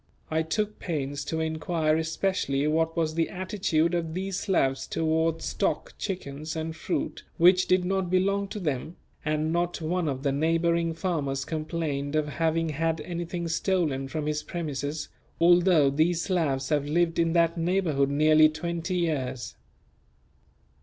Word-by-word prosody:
I 160 0 +2
took 210 +6 -2
pains 145 -4 -3
to 160 - -2
inquire 160 0 0
especially 160 -3 0
what 160 +2 +1
was 160 -2 +1
the 165 0 0
attitude 180 -3 0
of 165 -2 -2
these 190 0 -2
Slavs 135 -9 +1
towards 160 0 0
stock, - - -1
chickens, 155 -5 -4
and 160 0 -3
fruit 160 - -3
which 180 +2 +5
did 185 -1 +3
not 190 -1 0
belong 195 +2 +1
to 210 - -6
them; 155 -1 -3 0.3
and 155 +1 0
not 175 0 0
one 170 +1 -1
of 135 -2 -3
the 140 - +2
neighbouring 165 +3 +1
farmers 145 -7 -2
complained 155 -2 -3
of 155 -1 +1
having 165 +2 0
had 160 +2 -1
anything 170 0 -4
stolen 165 -5 0
from 150 +2 -3
his 150 0 -1
premises, 145 -3 -4 0.3
although 175 -4 +5
these 165 +4 +2
Slavs 145 -8 0
have 145 -2 +1
lived 165 +2 +1
in 165 -1 +2
that 170 -1 +3
neighbourhood 165 -5 +1
nearly 155 +2 +5
twenty 170 +3 -3
years. 135 -7 -2
160 Hz, 145 wpm, -27 LUFS, 150-175 Hz, 0.3 s, which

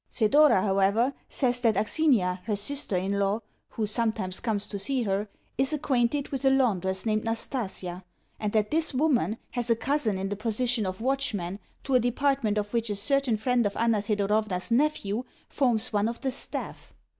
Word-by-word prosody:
Thedora, 255 -2 +4
however, 200 +6 +2 0.2
says 245 -2 +1
that 230 -4 +2
Aksinia, 210 - +2
her 215 - 0
sister 210 -1 0
in 195 +2 -1
law 200 +3 +1 0.3
(who 220 - -2
sometimes 215 -4 -1
comes 210 -3 -1
to 200 - -6
see 250 +5 0
her), 200 0 -1 0.3
is 270 +3 +2
acquainted 275 -1 0
with 270 -1 -4
a 270 - +5
laundress 195 -8 +1
named 215 -1 +1
Nastasia, 205 -6 -3 0.4
and 210 -1 -1
that 215 -1 +1
this 315 -3 +2
woman 250 - +2
has 245 -1 -2
a 230 - +5
cousin 230 -3 0
in 195 +1 -3
the 205 - -2
position 225 +1 0
of 185 +3 -5
watchman 220 -8 -1 0.2
to 270 - -2
a 255 - +6
department 245 -2 +1
of 210 +1 -2
which 230 -1 0
a 205 - -1
certain 260 +2 +2
friend 245 +2 +1
of 200 - -6
Anna 230 -2 +2
Thedorovna's 210 -1 0
nephew 240 -4 +1 0.2
forms 245 -5 0
one 210 +1 +2
of 235 - -6
the 265 -1 -1
staff. 255 - -6
225 Hz, 180 wpm, -27 LUFS, 205-260 Hz, 0.4 s, a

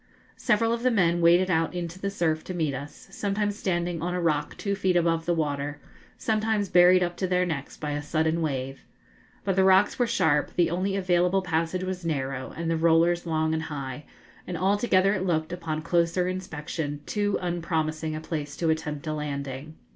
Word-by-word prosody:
Several 230 0 +2
of 235 - -2
the 255 - +3
men 175 -7 +2
waded 175 +2 +5
out 165 +1 +1
into 175 0 -5
the 200 - -2
surf 160 -5 0
to 185 - -5
meet 155 -5 0
us, 140 +2 -8
sometimes 205 +1 -1
standing 175 -4 -1
on 180 +1 -2
a - - -1
rock 150 -4 0
two 200 - -2
feet 190 -2 +1
above 165 -1 +1
the 175 - +3
water, 145 -2 -2 0.4
sometimes 215 -2 0
buried 180 +1 +6
up 175 0 -2
to 185 - -1
their 180 0 +2
necks 150 -5 -4
by 150 -1 -4
a 145 0 -2
sudden 160 +2 0
wave. 135 -3 -3 0.6
But 195 -2 0
the 190 - +4
rocks 190 +4 +4
were 245 - +3
sharp, 160 -11 +1
the 175 -2 +2
only 190 +3 -1
available 185 0 +2
passage 165 +1 -1
was 185 -1 -4
narrow, 135 -5 -3
and 165 0 -3
the 165 0 +1
rollers 170 +1 +3
long 160 -1 +1
and 160 - 0
high; 145 -2 -6 0.4
and 180 - -3
altogether 195 +1 +3
it 190 -2 -1
looked, 160 -2 0
upon 165 -3 -3
a - - -4
closer 170 +1 +1
inspection, 160 -5 -4
too 205 -1 0
unpromising 160 -3 -2
a 155 - -5
place 150 -3 -5
to 165 -2 +1
attempt 150 -2 -3
a 155 - -2
landing. 140 0 -5
170 Hz, 195 wpm, -26 LUFS, 155-185 Hz, 0.6 s, buried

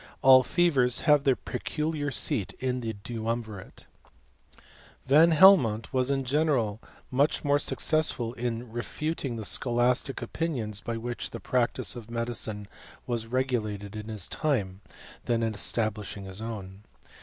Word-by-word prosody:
All 130 -1 +8
fevers 135 -5 +2
luive 150 -3 +4
B 135 -2 +4
peculiar 150 +3 -3
seat 110 -6 0
in 130 -1 -1
the 115 -2 -4
duumvirate. 110 -1 -5
i - - -31 0.5
Van 155 +5 +6
Helmont 150 - +5
was 130 0 +1
in 135 -1 0
general 130 -6 0 0.3
much 140 +4 +1
more 145 -1 +3
succei 140 -7 0
in 120 -1 -4
refuting 135 +3 -3
the 110 -2 -5
scholastic 125 +4 +1
opinions 115 -11 -3
by 115 +2 -4
which 120 +1 -4
the - - -7
pral 125 -2 +1 0.3
of 115 -2 -9
medicine 115 -3 -3 0.4
was 115 -2 -2
regulated 110 -5 -2
in 105 0 -6
his 110 -4 -3
time, 100 -11 -2 0.4
than 115 -1 0
in 110 -1 -1
estafal 110 -1 -1
ing" 100 - -8
his 95 +2 -5
own. 100 -4 -7
120 Hz, 140 wpm, -27 LUFS, 110-135 Hz, 0.5 s, All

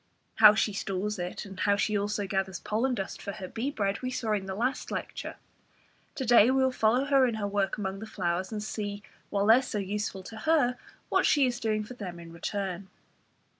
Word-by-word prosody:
How 215 -1 +9
she 215 -1 +1
stores 200 +1 -2
it, 180 +3 -4
and 195 -2 -10
how 200 -1 +3
she 205 +2 0
also 205 0 -1
gathers 190 -1 -2
pollen 245 +4 0
dust 195 -4 -5
for 200 - -5
her 195 -3 -7
bee 230 +8 -3
bread, 200 -7 -1
we 255 - -2
saw 230 -3 -2
in 200 -2 -1
the 190 - -4
last 250 +6 -1
lecture; - - -5 0.8
to 270 -4 -3
day 235 -1 +7
we 265 0 +3
will 260 - +3
follow 245 +2 +2
her 275 -2 +4
in 235 - -1
her 215 -2 -2
work 200 -1 0
among 195 -1 -3
the 220 - -7
flowers, 185 -2 -2
and 210 -1 -3
see, 205 -1 -4 0.3
while 200 -1 +1
they 225 +3 +8
are - - +2
so 250 -4 -4
useful 200 -1 -3
to 220 +4 -9
her, 265 -1 +2 0.3
what - - +3
she 285 -3 +4
is 245 -1 -1
doing 215 -3 0
for 210 - -9
them 185 -7 -7
in 165 -1 -11
return. 190 +1 -4
210 Hz, 220 wpm, -29 LUFS, 195-235 Hz, 0.8 s, How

